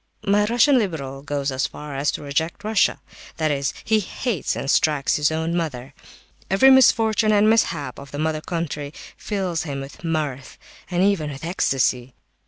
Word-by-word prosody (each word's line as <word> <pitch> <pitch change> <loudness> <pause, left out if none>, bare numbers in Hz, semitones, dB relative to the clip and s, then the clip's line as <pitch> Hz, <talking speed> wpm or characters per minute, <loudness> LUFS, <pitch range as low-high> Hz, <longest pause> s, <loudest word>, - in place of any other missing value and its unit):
My 205 +1 +3
Russian 245 +4 +4
liberal 140 - -4
goes 140 -1 -2
so 130 -1 -5
far 145 +1 -4
as 140 +2 0
to - - -5
reject 160 +7 -2
Russia; 215 -1 +2 0.4
that 155 -1 +1
is, 140 -1 -1
he 220 0 +2
hates 210 - -2
and - - -4
strikes 150 -3 +2
his 150 +1 +2
own 160 +2 -1
mother. 140 -6 -4 0.6
Every 265 +8 +6
misfortune 225 -4 +4
and 210 0 +4
mishap 165 - +1
of 140 0 -11
the 145 - -7
mother 155 0 -1
country 155 -3 -4 0.2
fills 190 -5 -2
him 140 -4 -4
with 135 +4 -10
mirth, 150 -5 -3 0.3
and 180 0 +1
even 195 -7 +1
with 140 +2 -7
ecstasy. 130 - 0
160 Hz, 170 wpm, -22 LUFS, 140-200 Hz, 0.6 s, Every